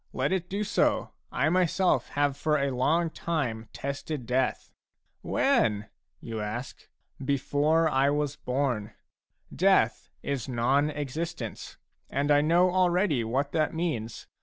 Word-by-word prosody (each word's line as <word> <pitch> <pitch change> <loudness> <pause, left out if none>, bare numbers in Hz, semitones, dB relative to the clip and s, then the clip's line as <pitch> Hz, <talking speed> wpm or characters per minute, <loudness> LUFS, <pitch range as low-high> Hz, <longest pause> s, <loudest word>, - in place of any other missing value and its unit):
Let 130 +2 0
it 180 -2 -1
do 200 +2 -1
so; - - +1 0.2
I 140 +4 +1
myself 185 +1 +2
have 145 -1 +2
for 150 +1 +1
a 140 -1 0
long 160 +6 +2
time 120 -12 -3
tested 140 -1 -5
death." 125 +2 -1 0.3
" - - -48 0.2
When? 105 -1 +2
" - - -56
you 115 -2 -5
ask. 115 +5 -6 0.4
Before 145 +4 +2
I 135 -2 +3
was 145 0 -1
born. 125 -7 -2 0.6
Death 185 - +3
is 135 -3 -3
non 130 +5 +2
existence, 150 -3 -5 0.3
and 145 +1 0
I 145 0 +6
know 175 +4 +4
already 180 - +2
what 135 +5 -1
that 155 0 0
means. 145 -10 -3
145 Hz, 135 wpm, -28 LUFS, 125-165 Hz, 0.6 s, I